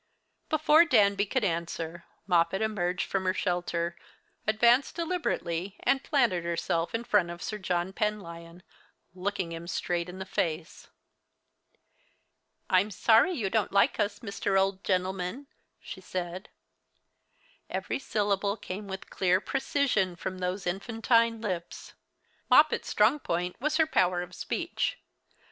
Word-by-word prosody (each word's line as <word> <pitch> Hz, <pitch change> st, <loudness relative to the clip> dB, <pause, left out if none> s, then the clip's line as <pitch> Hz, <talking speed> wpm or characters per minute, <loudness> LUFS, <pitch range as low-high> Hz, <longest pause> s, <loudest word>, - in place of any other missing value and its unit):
Before 310 Hz, +1 st, +5 dB
Danby 205 Hz, -9 st, +3 dB
could 260 Hz, +3 st, 0 dB
answer, 170 Hz, -1 st, -3 dB, 0.2 s
Moppet 180 Hz, +2 st, +2 dB
emerged 180 Hz, -4 st, -1 dB
from 190 Hz, -1 st, -2 dB
her 185 Hz, 0 st, +1 dB
shelter, 175 Hz, -2 st, -1 dB, 0.5 s
advanced 235 Hz, +5 st, +4 dB
deliberately, 205 Hz, -, -2 dB
and 270 Hz, 0 st, +2 dB
planted 235 Hz, -, +2 dB
herself 170 Hz, +1 st, -1 dB
in 230 Hz, -, -2 dB
front 205 Hz, -7 st, +2 dB
of 175 Hz, 0 st, -7 dB
Sir 215 Hz, -, -4 dB
John 180 Hz, 0 st, -1 dB
Penlyon, 175 Hz, -5 st, -4 dB, 0.5 s
looking 185 Hz, -1 st, -3 dB
him 165 Hz, +1 st, -7 dB
straight 175 Hz, 0 st, -2 dB
in 180 Hz, -, -8 dB
the 190 Hz, -, -5 dB
face. 170 Hz, -3 st, -3 dB, 1.8 s
"I'm 185 Hz, +3 st, +3 dB
sorry 225 Hz, -, +4 dB
you 215 Hz, -, -2 dB
don't 220 Hz, -3 st, +1 dB
like 200 Hz, 0 st, +3 dB
us, 205 Hz, 0 st, -1 dB
Mr. 200 Hz, -2 st, 0 dB
Old 195 Hz, 0 st, 0 dB
Gentleman," 185 Hz, +6 st, -1 dB, 0.3 s
she 190 Hz, -, -9 dB
said. 180 Hz, 0 st, -5 dB, 1.2 s
Every -, -, -3 dB
syllable 205 Hz, -3 st, 0 dB
came 200 Hz, +1 st, -6 dB
with 190 Hz, 0 st, -7 dB
clear 185 Hz, -1 st, +2 dB
precision 250 Hz, -7 st, 0 dB
from 185 Hz, +1 st, -5 dB
those 185 Hz, +1 st, -3 dB
infantine 225 Hz, +4 st, +1 dB
lips. 180 Hz, -6 st, -5 dB, 0.6 s
Moppet's 300 Hz, +4 st, +5 dB
strong 220 Hz, +8 st, +3 dB
point 180 Hz, -6 st, -2 dB
was 305 Hz, +2 st, +1 dB
her 320 Hz, -, +5 dB
power 180 Hz, -, +1 dB
of 180 Hz, -, -11 dB
speech. -, -, -2 dB
195 Hz, 130 wpm, -29 LUFS, 180-220 Hz, 1.8 s, Before